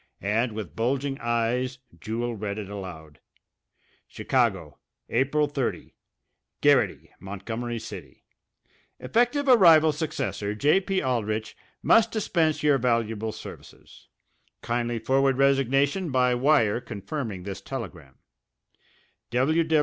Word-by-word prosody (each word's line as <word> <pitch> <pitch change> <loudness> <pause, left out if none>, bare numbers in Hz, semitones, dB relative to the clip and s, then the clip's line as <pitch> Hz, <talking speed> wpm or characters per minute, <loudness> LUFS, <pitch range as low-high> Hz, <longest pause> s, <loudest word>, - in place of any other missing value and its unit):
And 110 +3 0
with 100 -8 -7
bulging 135 +4 -1
eyes 120 +2 -1 0.2
Jewel 115 +5 -3
read 100 -1 -4
it 100 -2 -6
aloud: 85 -7 -9 0.9
Chicago, 95 - -1 0.3
April 140 +5 +2
30. 140 -4 -3 0.7
GARRITY, - - +2
Montgomery 115 +5 -5
City: - - -10 0.7
Effective 245 +5 +1
arrival 165 -10 +7
successor 140 -9 -3
J.P. 190 - +2
Aldrich 110 -4 -2 0.3
must 225 - +5
dispense 165 -9 0
your 145 -2 +4
valuable 115 -3 0
services. 110 - -12 0.6
Kindly 120 0 -1
forward 135 +2 +2
resignation 140 +5 +2
by 125 -2 +2
wire 125 -4 +3
confirming 115 - -5
this 95 0 -6
telegram. 90 - -8
120 Hz, 95 wpm, -26 LUFS, 105-140 Hz, 0.9 s, arrival